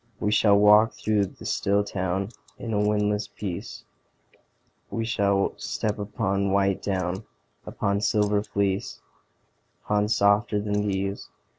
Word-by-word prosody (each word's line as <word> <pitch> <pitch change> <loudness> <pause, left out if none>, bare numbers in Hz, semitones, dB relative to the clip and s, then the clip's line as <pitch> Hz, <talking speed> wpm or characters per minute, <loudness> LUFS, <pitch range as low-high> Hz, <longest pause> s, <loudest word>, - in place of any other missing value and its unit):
We 105 - 0
shall 105 -1 +5
walk 105 +2 +6
through 105 -2 0
the - - -14
still 100 +1 +1
town 95 -1 -2 0.3
In 115 -2 -5
a 105 - +1
windless 105 0 +1
peace; 95 -5 -6 1.1
We 115 -1 -2
shall 100 -4 +1
step 105 -1 -3
upon 100 -1 -1
white 100 0 +1
down, 95 0 -2 0.4
Upon 100 +1 -1
silver 105 -1 +2
fleece, 100 -2 -2 0.9
Upon 105 0 +1
softer 105 0 +3
than 105 0 -1
these. 100 0 -3
100 Hz, 125 wpm, -25 LUFS, 100-105 Hz, 1.1 s, walk